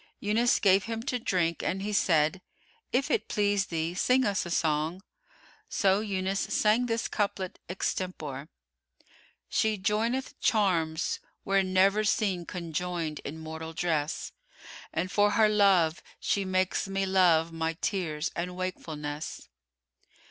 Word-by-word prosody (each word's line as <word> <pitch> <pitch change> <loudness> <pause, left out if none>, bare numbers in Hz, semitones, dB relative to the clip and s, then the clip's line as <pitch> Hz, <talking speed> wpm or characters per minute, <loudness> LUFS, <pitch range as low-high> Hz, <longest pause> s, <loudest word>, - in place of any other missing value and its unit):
Yunus 225 +4 +2
gave 195 -2 +4
him 225 0 -4
to 250 0 -1
drink 175 -6 0
and 195 +1 -2
he 210 +1 -2
said, 165 -1 +2 0.5
"If 270 +3 +1
it 455 - +1
please 205 -2 +1
thee, 165 0 -2
sing 250 +7 +3
us 200 -4 0
a - - -6
song." 160 +2 0 0.7
So 195 0 +3
Yunus 195 -2 -1
sang 220 +4 +2
this 230 -1 -1
couplet 200 -3 -2
extempore:— 155 -6 -3 1.0
She 220 -1 +1
joineth 225 +6 -1
charms 170 -7 +1 0.3
were 195 0 +3
never 190 +3 +3
seen 195 -4 0
conjoined 170 -2 -3
in 150 +3 -7
mortal 160 0 -7
dress: 160 -2 -1 0.3
* - - -14
And 180 +3 -2
for 205 0 +4
her 220 -1 +5
love 195 -6 +4 0.2
she 200 -1 0
makes 185 +1 0
me 195 0 -1
love 175 -4 +4
my 165 0 -1
tears 165 -3 -2
and 180 +1 -3
wakefulness. 155 - -5
185 Hz, 135 wpm, -29 LUFS, 165-205 Hz, 1.0 s, her